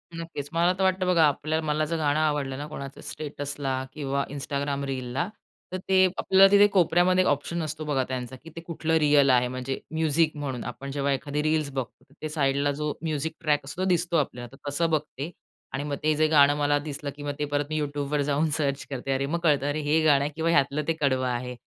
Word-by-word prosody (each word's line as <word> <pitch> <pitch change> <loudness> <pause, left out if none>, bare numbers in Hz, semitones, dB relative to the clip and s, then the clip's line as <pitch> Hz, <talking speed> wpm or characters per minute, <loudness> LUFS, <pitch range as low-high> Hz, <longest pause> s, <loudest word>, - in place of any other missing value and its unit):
नक्कीच 165 -4 -6
मला 170 +2 +3
तर 195 - 0
वाटतं 185 0 +2
बघा, 170 -3 +4
आपल्या 155 +2 -1
मला 155 0 0
जर 165 +2 -2
गाणं 150 -1 +1
आवडलं 145 -4 0
ना, 145 - -5
कोणाचं 140 -2 -8
स्टेटसला 140 -3 -4
किंवा 140 -2 -1
Instagram 140 0 -2
रीलला, 130 +4 -2 0.4
तर 185 - -2
ते 190 0 +6
आपल्याला 195 +1 +6
तिथे 205 0 +7
कोपऱ्यामध्ये 180 +1 +4
ऑप्शन 145 +4 -1
असतो 155 0 -5
बघा 140 -3 +1
त्यांचा 130 0 -4
की 165 - -10
ते 165 - -6
कुठलं 165 -1 -3
रिअल 145 -2 +5
आहे, 125 -1 +4
म्हणजे 130 +1 -4
म्युझिक 160 0 +1
म्हणून. 135 -4 -4
आपण 135 +3 -6
जेव्हा 140 0 0
एखादी 145 +2 -2
रील्स 155 -2 +1
बघतो, 130 -3 -5 0.2
त्या 155 - -3
साइडला 140 -1 +1
जो 150 +1 -2
म्युझिक 160 -1 -2
ट्रॅक 150 -3 +1
असतो 160 +6 -6
तो 190 - +1
दिसतो 175 -1 +1
आपल्याला. 125 -5 -2
तर 145 - -7
तसं 165 +4 0
बघते 150 -1 -2 0.4
आणि 140 - -2
मग 145 -1 -2
ते 155 0 +3
जे 155 +1 +3
गाणं 145 -2 +5
मला 145 0 +2
दिसलं 145 -1 -5
की 145 - -9
मग 145 - -2
ते 150 - 0
परत 145 0 -1
मी 155 - -1
YouTubeवर 145 0 -1
जाऊन 150 +3 +2
सर्च 140 -2 -1
करते. 135 -1 -4
अरे! 135 +1 0
मग 165 +5 -1
कळतं, 145 -4 +3
अरे! 150 - -1
हे 150 +2 +2
गाणं 145 -3 +5
आहे 150 - -2
किंवा 165 +1 0
ह्यातलं 140 0 +2
ते 165 - +2
कडवं 130 -2 +2
आहे. 125 0 -3
145 Hz, 215 wpm, -26 LUFS, 140-160 Hz, 0.4 s, तिथे